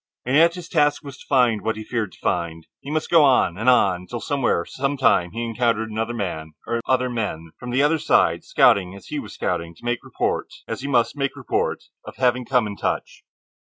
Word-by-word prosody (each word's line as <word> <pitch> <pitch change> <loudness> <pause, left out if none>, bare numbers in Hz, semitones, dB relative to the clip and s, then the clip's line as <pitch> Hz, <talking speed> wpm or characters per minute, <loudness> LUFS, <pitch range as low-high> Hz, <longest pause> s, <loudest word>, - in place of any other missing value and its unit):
And 125 +2 0
yet 170 +3 +5
his 175 -2 -8
task 150 -3 +2
was 140 -2 -9
to - - -15
find 125 -6 +3
what 110 - -1
he 110 - -6
feared 110 -5 -3
to - - -18
find. 80 -1 -2
He 140 - -10
must 155 +2 -2
on, 135 - +5
and 110 +6 +1
on, 90 -7 +3
till 120 - -5
somewhere, 130 -12 0
some 140 +2 -2
time, 115 -9 +3
he 115 +6 -5
encountered 115 -1 0
another 115 +2 -2
man, 80 -7 -4
or 115 0 -2
other 130 -1 +2
men, 105 -10 -4
from 125 - -7
the 130 +3 +2
other 155 +2 +2
side, - - +2
scouting, 95 -1 +3
as 100 - -13
he - - -3
was - - -9
scouting, 85 0 -3
to 120 - -16
make 120 0 -1
report, - - -2 0.2
as - - -4
he 140 - -4
must 125 -2 +2
make 140 -1 -2
report, - - -2 0.2
of - - -10
having 125 -1 +1
come 125 -2 +2
in 100 -1 -6
touch. - - -3
120 Hz, 220 wpm, -22 LUFS, 100-135 Hz, 0.2 s, yet